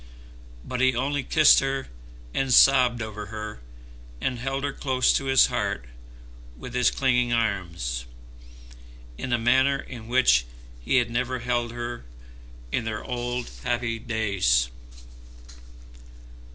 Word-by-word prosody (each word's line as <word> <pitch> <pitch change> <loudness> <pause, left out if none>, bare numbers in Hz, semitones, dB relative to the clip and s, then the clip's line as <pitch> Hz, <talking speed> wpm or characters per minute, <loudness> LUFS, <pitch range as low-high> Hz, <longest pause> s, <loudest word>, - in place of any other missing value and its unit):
But 125 0 -3
he 130 -1 +3
only 140 +3 -1
kissed 155 +3 +5
her, 135 0 -2 0.5
and 135 -1 -1
sobbed 125 -2 +5
over 105 -1 -7
her, 105 - -7 0.6
and 125 - -2
held 135 +2 -3
her 145 - -2
close 130 -2 +1
to 135 - -1
his 135 -1 +5
heart - - -2 0.7
with 120 - -9
his 125 0 +3
clinging 125 -3 +1
arms, 85 - -2 1.1
in 130 - -4
a 120 - +3
manner 130 +4 +3
in 120 -4 -10
which 115 - +3 0.4
he - - 0
had 120 -2 +2
never 125 +2 -1
held 120 -1 -1
her 120 0 -5 0.7
in 125 - -1
their 110 -1 -4
old 120 0 -4
happy 120 -2 -1
days. 100 - +1
120 Hz, 125 wpm, -25 LUFS, 110-130 Hz, 1.1 s, kissed